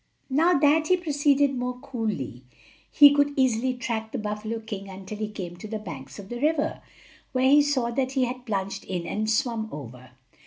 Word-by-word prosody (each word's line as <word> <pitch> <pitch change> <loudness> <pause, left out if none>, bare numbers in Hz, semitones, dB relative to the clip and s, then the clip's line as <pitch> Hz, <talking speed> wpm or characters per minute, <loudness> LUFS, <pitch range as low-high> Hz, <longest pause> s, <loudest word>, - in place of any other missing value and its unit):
Now 330 +6 +4
that 300 +2 +4
he 365 - +4
proceeded 285 -4 +2
more 250 0 -3
coolly, 220 - -4 0.5
he 290 -1 +8
could 285 0 +2
easily 255 -1 +2
track 225 -3 -3
the - - -3
buffalo 210 +2 -3
king 205 -3 -7
until 195 +2 -8
he 215 - -1
came 180 -5 -6
to 200 - -8
the 220 +1 -3
banks 150 -11 -9
of 200 -1 -10
the 240 0 -5
river, 305 0 +1 0.5
where 260 0 +3
he 295 +1 +7
saw 265 -5 0
that 260 +1 -1
he 265 -2 +2
had 250 +1 -6
plunged 195 -2 -2
in 180 -3 -3
and 215 +4 -2
swum 225 -1 0
over. 125 -3 -9
235 Hz, 190 wpm, -26 LUFS, 210-280 Hz, 0.5 s, he